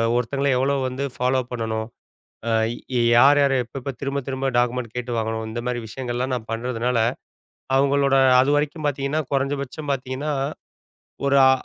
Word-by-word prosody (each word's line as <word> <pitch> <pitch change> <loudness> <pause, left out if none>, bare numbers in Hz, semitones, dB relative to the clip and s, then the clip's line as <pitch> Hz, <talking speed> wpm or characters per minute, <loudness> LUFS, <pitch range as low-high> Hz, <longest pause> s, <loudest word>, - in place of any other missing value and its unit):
ஒருத்தங்கள 135 +4 0
எவ்வலஓ 140 +2 +1
வந்து 130 +2 -4
ஃபாலோ 130 +1 +1
பண்ணனும், 110 -2 -2 0.6
ஆ - - +1 0.7
யார் 140 +4 +7
யார 140 - +3
எப்ப 120 - -13
எப்ப 135 +2 -4
திரும்பத் 140 -1 -3
திரும்ப 135 0 -2
டாக்குமெண்ட் 120 -1 0
கேட்டு 125 0 -3
வாங்கணும். 110 0 -2
இந்த 120 +2 -4
மாரி 125 -1 -1
விஷயங்கள் 120 +2 -5
எல்லாம் 130 +2 -1
நான் 115 -3 -5
பண்றதுனால, 120 +1 -1 0.8
அவங்களோட 140 0 +3 0.3
அதுவரைக்கும் 145 +3 +1
பாத்தீங்கன்னா, 140 +2 -1
குறைஞ்ச 140 +1 +1
பட்சம் 145 +2 -6
பாத்தீங்கன்னா, 135 +3 -3 0.9
ஒரு 140 - +3
ஆ - - +7
130 Hz, 150 wpm, -23 LUFS, 120-140 Hz, 0.9 s, யார்